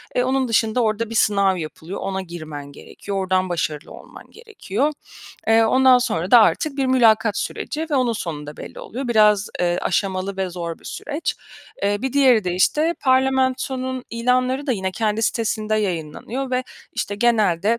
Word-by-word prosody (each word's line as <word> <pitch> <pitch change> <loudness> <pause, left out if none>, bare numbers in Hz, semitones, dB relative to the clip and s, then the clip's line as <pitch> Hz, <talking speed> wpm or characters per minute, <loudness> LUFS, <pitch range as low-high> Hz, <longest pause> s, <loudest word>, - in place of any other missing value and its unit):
Eee, 250 - +2
onun 260 0 +1
dışında 225 +1 +1
orada 220 0 0
bir 230 - -6
sınav 200 -3 +3
yapılıyor, 160 +3 -7
ona 190 0 -3
girmen 155 -5 -8
gerekiyor, 200 +7 -7
ordan 185 -1 0
başarılı 155 -3 -3
olman - - -13
gerekiyor. 305 - -3 0.5
Eee, 225 0 +5
ondan 255 +2 +5
sonra 185 -7 -2
da 240 - +9
artık 280 +6 +2
bir 270 -1 0
mülakat 225 -4 +3
süreci 315 +2 -3
ve - - +1
onun 250 -3 +2
sonunda 150 -8 -6
belli - - -9
oluyor. 255 +2 -6
Biraz, 210 -3 +4
eee, 175 0 +1
aşamalı 190 +1 -1
ve 190 -1 -2
zor 170 -2 -5
bir - - -24
süreç. 300 +2 -4 0.5
Eee, 205 +1 0
bir 265 -1 -2
diğeri 255 -7 +4
de, 180 - -1
işte, 305 - +2
parlamentonun 260 -1 +1
ilanları 255 +4 0
da 265 - +2
yine 190 -4 -2
kendi 220 +1 -1
sitesinde 215 -1 0
yayınlanıyor 210 - -3
ve, 255 0 0 0.3
işte, 205 - -3
genelde 215 -2 +2
220 Hz, 165 wpm, -21 LUFS, 190-255 Hz, 0.5 s, da